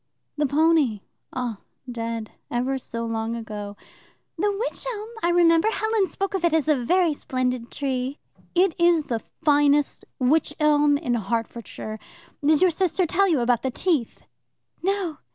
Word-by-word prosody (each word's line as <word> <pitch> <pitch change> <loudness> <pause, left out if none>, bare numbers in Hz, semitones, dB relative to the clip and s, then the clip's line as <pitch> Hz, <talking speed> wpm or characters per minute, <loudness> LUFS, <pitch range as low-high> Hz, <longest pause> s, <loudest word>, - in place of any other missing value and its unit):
"The 295 -1 +1
pony? 290 -7 +3 0.3
Oh, 245 -4 -3 0.3
dead, 230 -2 -4 0.2
ever 255 +3 -1
so 230 -2 -4
long 225 0 -2
ago." 210 -3 -6 0.6
"The 415 - +1
wych 415 +5 -3
elm 430 -1 -6
I 340 - +2
remember. 340 +1 +4
Helen 435 -1 +1
spoke 395 +1 -3
of 380 -3 -2
it 340 -2 +3
as 310 -2 +1
a 305 - +4
very 330 +6 +2
splendid 255 -3 -2
tree." 265 0 -2 0.4
"It 360 0 +4
is 340 -2 +4
the 235 -5 -2 0.2
finest 290 -1 +3
wych 280 +5 +2
elm 295 -1 +4
in 285 -5 -2
Hertfordshire. 225 0 -4 0.4
Did 305 +3 +4
your 365 - +5
sister 365 +2 +1
tell 390 +4 +2
you 305 -7 +2
about 240 -1 +2
the 265 - -1
teeth?" 280 -2 -1 0.6
"No." 375 -4 -1
290 Hz, 150 wpm, -24 LUFS, 240-345 Hz, 0.6 s, your